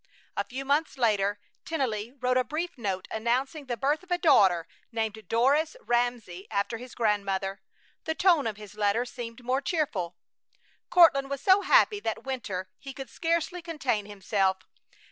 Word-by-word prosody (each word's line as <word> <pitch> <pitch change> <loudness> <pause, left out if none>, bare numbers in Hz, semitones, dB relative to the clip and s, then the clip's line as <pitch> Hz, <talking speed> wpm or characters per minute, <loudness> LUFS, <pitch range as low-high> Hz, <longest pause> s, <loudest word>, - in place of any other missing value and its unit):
A - - 0
few 270 +2 -6
months 285 +1 +1
later 205 -4 +2 0.2
Tennelly 240 -8 -2
wrote 250 0 +1
a 255 - +3
brief 335 +6 -4
note 195 -7 -3
announcing 260 +6 -1
the 240 -2 -2
birth 290 - +1
of 370 - -19
a 355 - +2
daughter, 195 - +4 0.2
named 220 -1 -3
Doris 280 - +2
Ramsey 240 - -1
after 210 +2 -1
his 250 +1 -10
grandmother. 200 -3 0 0.4
The 320 - -1
tone 340 -9 +4
of 215 -2 -4
his 210 -1 -11
letter 210 +3 +1
seemed 245 -2 -8
more 255 +3 0
cheerful. 215 - -2 0.7
Courtland 275 -6 +6
was 280 -1 -3
so 380 +5 +5
happy 405 +2 +4
that 225 - -3
winter 215 -9 -4
he 275 -1 -8
could 270 -4 -8
scarcely 335 +1 -1
contain 270 -11 -2
himself. 195 -2 0
245 Hz, 160 wpm, -28 LUFS, 210-295 Hz, 0.7 s, Courtland